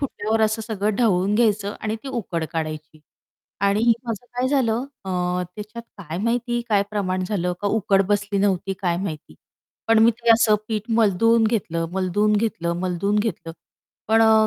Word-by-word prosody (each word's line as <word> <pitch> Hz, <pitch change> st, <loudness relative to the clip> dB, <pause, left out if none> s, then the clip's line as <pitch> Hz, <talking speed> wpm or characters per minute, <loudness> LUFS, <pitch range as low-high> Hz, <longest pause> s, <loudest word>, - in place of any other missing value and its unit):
फुटल्यावर 225 Hz, -5 st, -1 dB
असं 220 Hz, +1 st, -1 dB
सगळं 215 Hz, -1 st, -1 dB
ढवळून 200 Hz, -4 st, +2 dB
घ्यायचं 210 Hz, -3 st, +1 dB
आणि 215 Hz, 0 st, -2 dB
ती 275 Hz, -, -7 dB
उकड 200 Hz, -10 st, -3 dB
काढायची. 155 Hz, -1 st, -5 dB, 0.6 s
आणि 205 Hz, +4 st, +3 dB
माझं 230 Hz, -1 st, -4 dB
काय 250 Hz, +1 st, +1 dB
झालं 250 Hz, -4 st, +1 dB, 0.2 s
अ, 190 Hz, -, -5 dB, 0.4 s
त्याच्यात 215 Hz, +2 st, -8 dB, 0.2 s
काय 170 Hz, -3 st, -6 dB
माहिती 240 Hz, +3 st, 0 dB
काय 205 Hz, -3 st, +3 dB
प्रमाण 185 Hz, -3 st, -1 dB
झालं? 180 Hz, -4 st, -1 dB
का 205 Hz, -, -2 dB
उकड 200 Hz, -2 st, +2 dB
बसली 205 Hz, -1 st, 0 dB
नव्हती? 195 Hz, -1 st, +1 dB
काय 175 Hz, -2 st, +1 dB
माहिती. 160 Hz, -, -6 dB, 0.5 s
पण 225 Hz, 0 st, +5 dB
मी 230 Hz, -, +6 dB
ते 235 Hz, 0 st, 0 dB
असं 225 Hz, -1 st, +4 dB
पीठ 220 Hz, +1 st, -3 dB
मलदून 225 Hz, +1 st, +3 dB
घेतलं, 170 Hz, -7 st, -1 dB
मलदून 190 Hz, +3 st, +1 dB
घेतलं, 210 Hz, -6 st, -1 dB
मलदून 185 Hz, +3 st, 0 dB
घेतलं. 205 Hz, -6 st, -3 dB, 0.6 s
पण 225 Hz, +1 st, +4 dB
अ, 220 Hz, -1 st, +5 dB
210 Hz, 160 wpm, -22 LUFS, 190-225 Hz, 0.6 s, मी